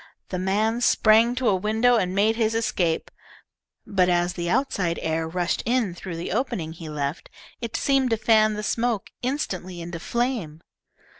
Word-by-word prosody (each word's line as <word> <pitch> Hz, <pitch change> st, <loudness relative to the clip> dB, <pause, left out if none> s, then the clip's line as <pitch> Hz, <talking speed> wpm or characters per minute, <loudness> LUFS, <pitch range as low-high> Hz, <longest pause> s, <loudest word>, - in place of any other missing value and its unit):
The 185 Hz, -, -3 dB
man 215 Hz, +5 st, 0 dB
sprang 225 Hz, +1 st, +4 dB
to 255 Hz, -1 st, 0 dB
a 200 Hz, -, +4 dB
window 220 Hz, +6 st, +2 dB
and 185 Hz, -4 st, 0 dB
made 215 Hz, +3 st, +3 dB
his 225 Hz, -1 st, +1 dB
escape, 180 Hz, -7 st, 0 dB, 0.7 s
but 185 Hz, -3 st, +2 dB
as 175 Hz, 0 st, +1 dB
the 170 Hz, -1 st, -3 dB
outside 180 Hz, -8 st, 0 dB
air 160 Hz, 0 st, -1 dB
rushed 175 Hz, +1 st, -1 dB
in 235 Hz, -6 st, 0 dB
through 175 Hz, 0 st, -7 dB
the 165 Hz, +1 st, -5 dB
opening 170 Hz, -11 st, -2 dB
he 165 Hz, -1 st, -9 dB
left, 145 Hz, 0 st, -4 dB, 0.3 s
it 235 Hz, -2 st, -5 dB
seemed 270 Hz, -2 st, +2 dB
to 225 Hz, -, +1 dB
fan 215 Hz, -1 st, +3 dB
the 210 Hz, -, -4 dB
smoke 230 Hz, -1 st, -1 dB
instantly 185 Hz, -, -3 dB
into 170 Hz, 0 st, -6 dB
flame. 230 Hz, -8 st, -2 dB
200 Hz, 165 wpm, -24 LUFS, 175-230 Hz, 0.7 s, sprang